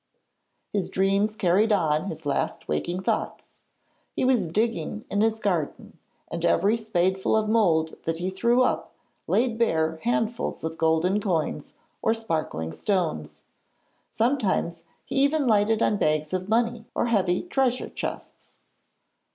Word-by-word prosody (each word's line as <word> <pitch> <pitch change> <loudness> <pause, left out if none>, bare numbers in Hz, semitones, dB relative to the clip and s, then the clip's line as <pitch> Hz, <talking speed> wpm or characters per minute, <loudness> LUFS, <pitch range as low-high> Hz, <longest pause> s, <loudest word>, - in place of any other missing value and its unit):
His 200 -3 -1
dreams 195 +3 +1
carried 200 +3 +2
on 160 -5 +2
his 160 -5 -6
last 140 - -2
waking 175 - -2
thoughts. - - -3 0.5
He - - 0
was 245 -9 +2
digging 215 +3 -1
in 205 - +1
his 220 0 +1
garden, 175 -8 -2 0.3
and 170 0 -5
every 200 +5 +3
spadeful 190 -2 +1
of 215 -1 0
mould 170 -8 +2
that 165 0 -1
he 180 +3 -2
threw 235 +6 +3
up - - -1 0.3
laid 235 -1 +1
bare 160 -8 +1
handfuls 235 -4 -1
of 160 0 -4
golden 160 +5 +2
coins 165 -6 -2 0.3
or 225 - +2
sparkling 155 - -3
stones. 80 - -2 0.7
Sometimes 210 -9 0 0.2
he - - -4
even 285 +2 +3
lighted 220 -1 +3
on 210 - +2
bags 155 -1 0
of 185 +1 -2
money 230 0 0
or - - +1
heavy 190 -6 +1
treasure 265 -7 0
chests. - - -7
195 Hz, 135 wpm, -25 LUFS, 165-225 Hz, 0.7 s, every